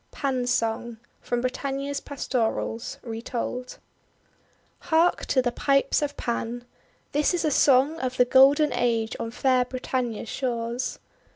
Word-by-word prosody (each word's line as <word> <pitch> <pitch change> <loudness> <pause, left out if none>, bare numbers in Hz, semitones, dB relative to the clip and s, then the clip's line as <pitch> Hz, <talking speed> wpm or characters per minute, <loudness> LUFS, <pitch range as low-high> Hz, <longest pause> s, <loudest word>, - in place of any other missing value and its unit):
PAN'S 255 -3 -1
SONG 230 0 -1 0.2
From 245 0 -2
Britannia 275 +2 -3
s 280 - -2
Pastorals 235 -4 -2
(retold} 240 +2 -5 1.0
HARK 335 +1 +2
to 260 - +2
the 245 - 0
Pipes 275 +4 +2
of 290 -1 -3
Pan! 240 0 -3 0.5
This 295 +4 +2
is 345 - -1
a 305 - +2
song 280 +4 +4
of 255 -1 -3
the 250 - +5
Golden 275 +4 +5
Age 230 -2 0
on 230 - -3
fair 255 +1 +2
Britannia's 250 -3 -3
shores. 240 -1 -3
255 Hz, 130 wpm, -25 LUFS, 235-275 Hz, 1.0 s, the